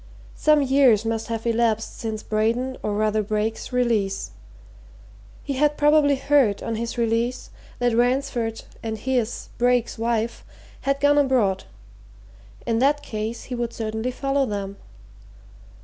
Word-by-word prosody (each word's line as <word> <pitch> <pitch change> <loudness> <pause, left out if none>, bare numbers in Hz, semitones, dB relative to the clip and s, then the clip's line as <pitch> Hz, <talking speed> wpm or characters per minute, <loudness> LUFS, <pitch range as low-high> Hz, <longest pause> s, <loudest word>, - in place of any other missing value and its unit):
Some 305 -1 +3
years 260 -5 +4
must 225 0 -2
have 225 -1 -4
elapsed 230 -1 +1
since 220 -1 -4
Braden, 230 +5 0
or 210 - -2
rather 215 0 +1
Brake's 215 +2 -2
release. 230 -6 0 1.1
He 280 - -3
had 295 +2 +2
probably 295 -1 +4
heard, 270 -6 +2
on 230 - -2
his 230 +2 -4
release, 235 +2 -1 0.3
that 245 -2 +1
Ransford 245 -2 0 0.2
and 220 -1 -4
his, 245 0 -2
Brake's, 245 -1 +1
wife 230 0 -1 0.5
had 275 0 +2
gone 290 0 +4
abroad 235 -9 +2 1.0
in 230 -1 +1
that 290 +3 +2
case 220 -2 -4
he 255 - -7
would 240 -1 -3
certainly 220 +2 -3
follow 275 +1 0
them. 200 -1 -4
235 Hz, 135 wpm, -23 LUFS, 220-265 Hz, 1.1 s, years